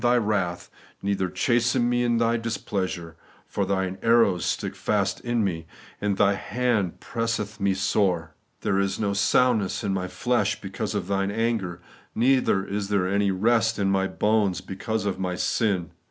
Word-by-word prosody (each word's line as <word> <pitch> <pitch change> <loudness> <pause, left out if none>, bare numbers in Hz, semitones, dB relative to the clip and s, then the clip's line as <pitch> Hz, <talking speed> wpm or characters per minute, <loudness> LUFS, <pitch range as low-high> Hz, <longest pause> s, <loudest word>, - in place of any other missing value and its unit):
Thy 120 0 +4
wrath, 105 -6 -1 0.3
neither 100 -2 0
chasten 120 +4 +2
me 120 0 +1
in 120 -1 +2
Thy 115 0 +2
displeasure; 95 -7 -3 0.3
for 100 -2 -2
Thine 95 -1 -1
arrows 115 -6 +4
stick - - -2
fast - - 0
in 120 -2 0
me, 80 -4 -2 0.3
and 100 -2 0
Thy 100 0 +4
hand 105 -2 -1
presseth 115 -2 -3
me 100 -1 +1
sore. 95 -4 0 0.3
There 95 - +1
is 100 0 0
no 100 -2 0
soundness 110 0 +2
in 100 -2 0
my 90 -1 -2
flesh 100 +3 0
because 100 +1 -4
of 100 -3 -1
Thine 100 0 0
anger, 100 -6 -1 0.3
neither 120 -5 +3
is 100 0 -3
there 100 -3 +1
any 100 +1 +1
rest 115 +4 +2
in 95 -1 +1
my 95 0 +2
bones 105 -3 +1
because 100 +3 -3
of 95 -2 -2
my 90 -1 -2
sin. 90 -3 0
100 Hz, 165 wpm, -25 LUFS, 95-115 Hz, 0.3 s, Thy